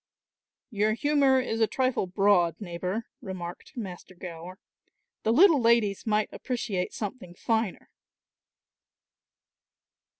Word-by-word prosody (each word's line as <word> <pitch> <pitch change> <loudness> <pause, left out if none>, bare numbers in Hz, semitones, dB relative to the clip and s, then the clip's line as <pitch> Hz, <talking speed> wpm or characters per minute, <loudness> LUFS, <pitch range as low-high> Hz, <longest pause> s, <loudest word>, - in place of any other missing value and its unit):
"Your 215 0 +1
humour 280 0 +3
is 225 -3 -2
a 220 - +5
trifle 255 -6 0
broad, 180 -3 +3
neighbour," 185 +3 -4 0.2
remarked 185 - -8
Master 185 -4 -7
Gower; 175 +1 -8 0.6
"the 220 - +1
little 315 - +6
ladies 230 -3 +2
might 210 0 +1
appreciate 230 -8 -3
something 205 -5 -6
finer." 220 0 -1
210 Hz, 100 wpm, -27 LUFS, 185-235 Hz, 0.6 s, little